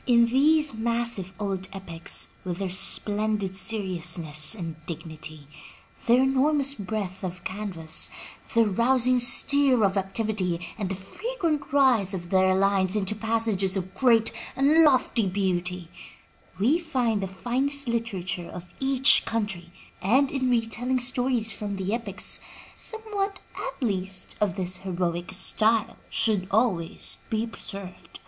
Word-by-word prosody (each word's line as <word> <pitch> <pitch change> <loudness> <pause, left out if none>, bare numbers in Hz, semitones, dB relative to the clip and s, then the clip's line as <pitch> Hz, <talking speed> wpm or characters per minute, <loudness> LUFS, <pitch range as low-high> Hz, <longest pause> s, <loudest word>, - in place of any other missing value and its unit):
In 235 -1 +5
these 295 +4 +3
massive 230 -4 -2
old 195 -2 -3
epics, 170 -4 -3
with 180 -2 -4
their 195 -2 -3
splendid 205 +1 +1
seriousness 175 -6 -1
and 165 -5 -7
dignity, 155 -3 -7 0.6
their 245 +2 +5
enormous 275 +1 +3
breadth 200 -4 -5
of 180 -1 -6
canvas, 185 -6 0 0.5
their 230 -1 +5
rousing 250 +4 +2
stir 260 0 +6
of 195 0 0
activity, 195 -2 -1 0.2
and 200 -4 -4
the 195 - -2
frequent 315 - -3
rise 245 -9 +3
of 175 -1 -8
their 190 0 +3
lines 195 0 +2
into 205 -1 +2
passages 215 -3 +1
of 185 0 -5
great 230 -4 +4 0.2
and 295 +4 +4
lofty 255 -7 +3
beauty, 180 -2 -2 0.7
we 260 - +2
find 250 -10 -1
the 195 - -2
finest 260 +8 -2
literature 195 -7 -3
of 180 0 -10
each 270 0 +5
country, 200 -6 -4 0.3
and 260 +8 +2
in 260 -2 -1
retelling 240 +2 0
stories 245 -2 +2
from 200 0 -5
the 195 +2 -3
epics, 220 -4 -2 0.3
somewhat, 410 -3 -4 0.2
at - - -6
least, 190 -3 -2
of 200 -5 +1
this 185 0 -2
heroic 175 -2 -3
style 215 +4 +1
should 205 -5 +1
always 195 -6 -1
be 225 0 -1
preserved. 200 -4 -7
210 Hz, 130 wpm, -25 LUFS, 185-250 Hz, 0.7 s, stir